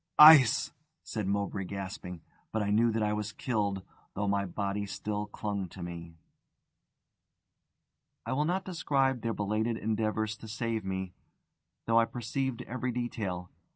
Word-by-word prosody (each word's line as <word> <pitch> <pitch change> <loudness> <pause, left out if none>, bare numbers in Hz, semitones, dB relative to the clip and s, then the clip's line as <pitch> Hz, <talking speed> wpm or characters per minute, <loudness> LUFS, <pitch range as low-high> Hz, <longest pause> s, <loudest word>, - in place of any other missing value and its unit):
"Ice!" 150 -7 +9 0.3
said 110 -4 -3
Mowbray, 100 -1 -1
gasping. 95 -2 -6 0.3
But 110 -1 0
I 100 - 0
knew 115 +3 +4
that 110 -1 0
I 105 0 +1
was 105 0 -2
killed, 100 -7 -1 0.3
though 100 +1 -1
my 100 0 +1
body 100 +2 -2
still 105 +1 -3
clung 100 -2 -3
to 90 +1 -8
me. 85 -1 -7 2.1
I - - -1
will 145 +3 +1
not 185 +3 0
describe 135 -8 +1
their 115 -1 -1
belated 110 +3 0
endeavours 110 0 -1
to 110 - -10
save 115 0 -2
me, 95 -1 -3 0.7
though 115 0 +4
I 115 - +4
perceived 125 +2 -3
every 125 +1 -3
detail. 105 -7 -3
105 Hz, 145 wpm, -30 LUFS, 100-115 Hz, 2.1 s, Ice